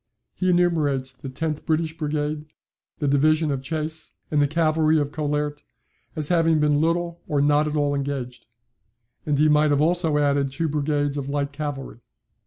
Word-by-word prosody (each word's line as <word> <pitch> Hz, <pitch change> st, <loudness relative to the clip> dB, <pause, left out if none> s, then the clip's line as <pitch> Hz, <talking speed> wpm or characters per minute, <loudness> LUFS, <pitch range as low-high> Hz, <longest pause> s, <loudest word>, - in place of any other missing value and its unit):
He 185 Hz, -, -1 dB
enumerates 155 Hz, -7 st, +2 dB
the 130 Hz, +1 st, -9 dB
tenth 155 Hz, +3 st, -3 dB
British 160 Hz, 0 st, 0 dB
Brigade, 150 Hz, -1 st, -2 dB, 0.5 s
the 145 Hz, -, -1 dB
division 155 Hz, +2 st, +3 dB
of 135 Hz, -2 st, -2 dB
Chasse, 155 Hz, +2 st, -4 dB, 0.2 s
and 150 Hz, -1 st, +3 dB
the 145 Hz, -, +3 dB
cavalry 155 Hz, 0 st, +2 dB
of 145 Hz, -1 st, 0 dB
Collaert, 150 Hz, -1 st, -2 dB, 0.5 s
as 155 Hz, -2 st, -1 dB
having 165 Hz, -2 st, +3 dB
been 150 Hz, -1 st, +2 dB
little 170 Hz, +1 st, -1 dB
or 145 Hz, -, 0 dB
not 145 Hz, +1 st, +3 dB
at 150 Hz, -, -3 dB
all 145 Hz, -1 st, +1 dB
engaged; 135 Hz, -3 st, -4 dB, 0.8 s
and 145 Hz, -1 st, +1 dB
he 155 Hz, +2 st, +4 dB
might 150 Hz, 0 st, +4 dB
have 145 Hz, -1 st, +2 dB
also 165 Hz, -1 st, +2 dB
added 140 Hz, -1 st, +2 dB
two 165 Hz, +5 st, -2 dB
brigades 145 Hz, -1 st, -1 dB
of 140 Hz, -1 st, -4 dB
light 140 Hz, 0 st, -1 dB
cavalry." 145 Hz, -5 st, -5 dB
150 Hz, 170 wpm, -24 LUFS, 145-155 Hz, 0.8 s, he